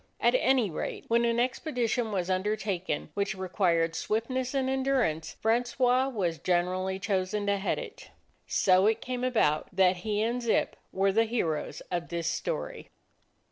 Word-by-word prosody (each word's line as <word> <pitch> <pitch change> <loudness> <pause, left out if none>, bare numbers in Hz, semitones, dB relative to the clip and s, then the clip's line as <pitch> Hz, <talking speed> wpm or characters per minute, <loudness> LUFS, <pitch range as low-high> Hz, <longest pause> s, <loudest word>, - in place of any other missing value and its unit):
At - - +3
any 265 - +3
rate, - - -4
when 235 +1 +3
an 235 0 +1
expedition 245 -3 -1
was 185 -3 -1
undertaken 190 -4 -2
which 200 0 -1
re 190 0 -5
quired 170 -4 +2
swiftness 255 +7 -2
and 265 -1 +1
endurance, 265 - 0
Francois 245 +3 +2
was 180 - -2
generally 185 +3 0
chosen 195 +1 -1
to 200 0 +2
head 195 - -1
it. - - -8 0.4
So 185 +1 +4
it 220 +1 +2
came 250 +1 -4
about 215 -12 +2
that 185 -1 +3
he 210 +3 -1
and 240 +2 -1
Zip 235 -2 +1 0.2
were 195 +1 +2
the 225 +3 +3
heroes 170 -10 -2
of 175 -1 -2
this 170 -1 -3
story. - - -3
210 Hz, 155 wpm, -29 LUFS, 185-245 Hz, 0.4 s, So